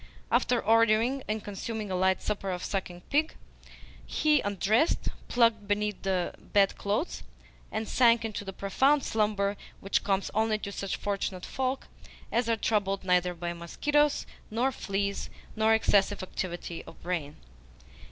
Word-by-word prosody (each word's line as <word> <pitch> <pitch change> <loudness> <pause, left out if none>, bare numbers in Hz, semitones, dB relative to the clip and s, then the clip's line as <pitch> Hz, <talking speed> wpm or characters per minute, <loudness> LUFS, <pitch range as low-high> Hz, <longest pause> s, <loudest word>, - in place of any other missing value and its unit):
After 245 - +3
ordering 230 +4 +3
and 215 0 -2
consuming 210 0 -5
a - - 0
light 190 +1 +2
supper 200 -2 -2
of 180 -1 -3
sucking 180 -3 -3
pig, 305 +2 +2 0.7
he 300 -3 +2
undressed, 205 - +1 0.2
plunged 230 -4 +3
beneath 210 0 -1
the 185 -2 0
bedclothes, 200 - 0 0.5
and 220 0 -2
sank 235 -2 +4
into 215 -2 -4
the 195 - -5
profound 265 +9 +2
slumber 205 -2 0 0.2
which 195 - 0
comes 195 -1 0
only 220 +1 +2
to 200 -1 -6
such 195 -1 -3
fortunate 195 -2 -3
folk 265 0 -2 0.4
as 235 0 +1
are 230 - +2
troubled 195 -3 0
neither 180 -1 +2
with 170 0 -4
mosquitoes 295 - +1 0.2
nor 240 +5 +1
fleas 200 -4 -2 0.3
nor 220 0 +3
excessive 205 -2 +2
activity 175 -2 -5
of - - -13
brain. 165 -5 -3
205 Hz, 140 wpm, -29 LUFS, 195-230 Hz, 0.7 s, sank